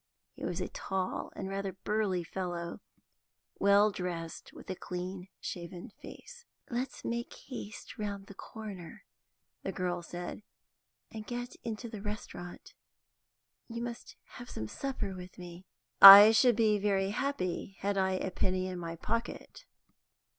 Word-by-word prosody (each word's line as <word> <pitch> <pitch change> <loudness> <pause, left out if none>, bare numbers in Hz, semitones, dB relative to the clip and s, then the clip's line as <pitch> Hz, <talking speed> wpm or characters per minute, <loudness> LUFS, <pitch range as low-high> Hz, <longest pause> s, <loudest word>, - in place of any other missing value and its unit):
He - - -11
was - - -2
a - - -2
tall 190 -1 -3
and - - -4
rather 195 0 -3
burly 195 -2 -1
fellow, 175 -1 -4 0.8
well 200 +1 +5
dressed, 170 -3 -5
with - - -13
a - - -3
clean 180 +1 -6
shaven 175 0 -6
face. 480 - -12 0.3
"Let's 245 +2 -3
make 235 0 -2
haste 220 -6 -9
round 200 -2 -4
the 200 - -11
corner," 195 -5 -9 0.6
the 195 - -3
girl 180 -2 -2
said, 175 +3 -6 0.7
"and 215 -1 -8
get 245 0 -5
into 230 0 -4
the 215 -3 -7
restaurant. 205 -4 -7 0.9
You 235 0 -5
must 240 0 -7 0.2
have 245 0 -9
some 110 - -5
supper 260 - -4
with 180 -1 -10
me." 175 +1 -10 0.3
"I 200 +2 +14
should 240 +1 +5
be 215 -2 +3
very 195 -1 +1
happy, 195 -7 -2
had 200 +1 0
I 190 -1 +2
a 185 0 -2
penny 185 0 0
in 180 -1 -5
my 165 -1 -5
pocket." 230 - -4
195 Hz, 140 wpm, -31 LUFS, 180-220 Hz, 0.9 s, I